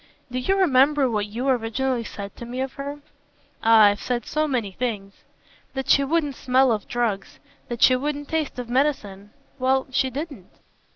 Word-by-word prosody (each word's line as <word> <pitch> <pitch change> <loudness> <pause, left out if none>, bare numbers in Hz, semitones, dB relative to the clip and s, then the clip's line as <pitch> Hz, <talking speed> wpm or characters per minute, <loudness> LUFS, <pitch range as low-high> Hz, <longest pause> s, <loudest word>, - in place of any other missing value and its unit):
"Do 255 - -2
you 380 +10 +1
remember 285 -5 +4
what 210 -2 -1
you 235 +6 -4
originally 250 0 0
said 200 -3 -8
to - - -8
me 250 +2 -5
of 265 0 -3
her?" 285 +1 -6 0.6
"Ah 225 -1 +6
I've 205 0 +4
said 240 -2 -2
so 305 0 0
many 240 -8 -1
things." 200 -3 -4 0.6
"That 265 0 -1
she 280 - +5
wouldn't 295 0 0
smell 260 0 +3
of 210 -3 -2
drugs, 230 -5 -2 0.3
that 240 -1 -2
she 255 - +7
wouldn't 290 +2 -3
taste 315 -5 -2
of 250 -1 -5
medicine. 235 -7 -1 0.3
Well, 260 +1 +2
she 260 +1 +1
didn't." 275 - -7
255 Hz, 175 wpm, -23 LUFS, 225-275 Hz, 0.6 s, she